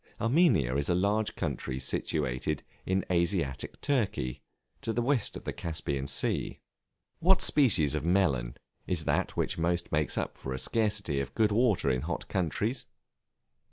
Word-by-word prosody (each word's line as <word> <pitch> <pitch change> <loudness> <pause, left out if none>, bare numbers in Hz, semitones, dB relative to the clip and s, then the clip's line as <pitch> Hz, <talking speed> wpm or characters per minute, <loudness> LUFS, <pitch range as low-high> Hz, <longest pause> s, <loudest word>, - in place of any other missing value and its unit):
Armenia 115 - +3
is 70 - -1
a 85 - +3
large 105 +4 +1
country 65 - -3
situated 65 -1 -1 0.2
in 95 +1 +1
Asiatic 85 -6 -1
Turkey, 105 - -1 0.4
to 115 - -2
the 120 - 0
west 125 -3 +1
of - - -11
the - - -4
Caspian 70 -4 -3
Sea. - - -1 0.6
What 190 +2 +4
species 100 - +4
of 75 - -1
Melon 80 -10 +1 0.3
is 85 -3 0
that - - 0
which - - -1
almost 85 +1 0
makes 75 -1 +1
up - - -3
for 65 - -4
a - - -4
scarcity 100 - 0
of 70 - -7
good 110 -2 +3
water 105 - +3
in 65 0 0
hot - - -4
countries? 105 - -1
85 Hz, 155 wpm, -30 LUFS, 70-110 Hz, 0.6 s, What